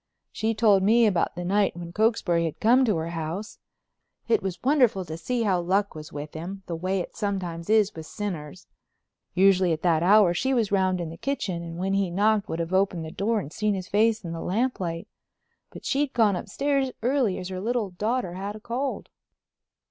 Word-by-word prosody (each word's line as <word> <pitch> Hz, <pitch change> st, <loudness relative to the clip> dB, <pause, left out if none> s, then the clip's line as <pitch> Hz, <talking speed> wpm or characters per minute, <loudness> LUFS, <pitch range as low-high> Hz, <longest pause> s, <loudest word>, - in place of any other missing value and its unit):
She 220 Hz, +1 st, -1 dB
told 210 Hz, -3 st, +4 dB
me 225 Hz, +4 st, +5 dB
about 185 Hz, -5 st, +1 dB
the 175 Hz, 0 st, -5 dB
night 200 Hz, -1 st, +1 dB
when 170 Hz, -1 st, -7 dB
Cokesbury 195 Hz, -6 st, +2 dB
had 160 Hz, -, -4 dB
come 245 Hz, +4 st, +5 dB
to 215 Hz, -5 st, +2 dB
her 160 Hz, +1 st, -3 dB
house. 170 Hz, +6 st, -5 dB, 0.7 s
It 445 Hz, -, +3 dB
was 185 Hz, -2 st, -3 dB
wonderful 250 Hz, -9 st, +3 dB
to 160 Hz, -, -6 dB
see 235 Hz, +8 st, -2 dB
how 190 Hz, -4 st, +2 dB
luck 195 Hz, +4 st, 0 dB
was 155 Hz, -1 st, -9 dB
with 145 Hz, +1 st, -7 dB
him—the 180 Hz, +2 st, -6 dB
way 185 Hz, +3 st, -1 dB
it -, -, -8 dB
sometimes 190 Hz, -5 st, -3 dB
is 215 Hz, -2 st, +4 dB
with 160 Hz, -1 st, -9 dB
sinners. 180 Hz, -5 st, -6 dB, 0.7 s
Usually 185 Hz, -1 st, +4 dB
at 155 Hz, -, -5 dB
that 165 Hz, -3 st, +3 dB
hour 195 Hz, 0 st, +5 dB
she 265 Hz, +9 st, 0 dB
was 225 Hz, -5 st, +1 dB
round 185 Hz, -2 st, +2 dB
in 170 Hz, -2 st, -4 dB
the 165 Hz, -, -9 dB
kitchen 200 Hz, -10 st, -2 dB
and 165 Hz, 0 st, -7 dB
when 190 Hz, +2 st, -1 dB
he 195 Hz, -2 st, +1 dB
knocked 205 Hz, +3 st, +1 dB
would 160 Hz, -, -2 dB
have 170 Hz, +2 st, -3 dB
opened 185 Hz, -4 st, +1 dB
the 160 Hz, -, -7 dB
door 215 Hz, +5 st, 0 dB
and 160 Hz, -5 st, -7 dB
seen 210 Hz, -1 st, 0 dB
his 185 Hz, -1 st, -5 dB
face 215 Hz, -1 st, +2 dB
in 170 Hz, -, -4 dB
the 165 Hz, -, -5 dB
lamplight. 185 Hz, -6 st, -2 dB, 0.6 s
But -, -, -12 dB
she'd 280 Hz, 0 st, 0 dB
gone 220 Hz, -5 st, +3 dB
upstairs 275 Hz, +8 st, -1 dB
early 250 Hz, -6 st, +1 dB
as 180 Hz, -, -6 dB
her 185 Hz, -1 st, -5 dB
little 225 Hz, -2 st, -1 dB
daughter 210 Hz, +1 st, -2 dB
had 200 Hz, +3 st, -5 dB
a -, -, -9 dB
cold. 250 Hz, +5 st, -3 dB
195 Hz, 200 wpm, -26 LUFS, 175-220 Hz, 0.7 s, me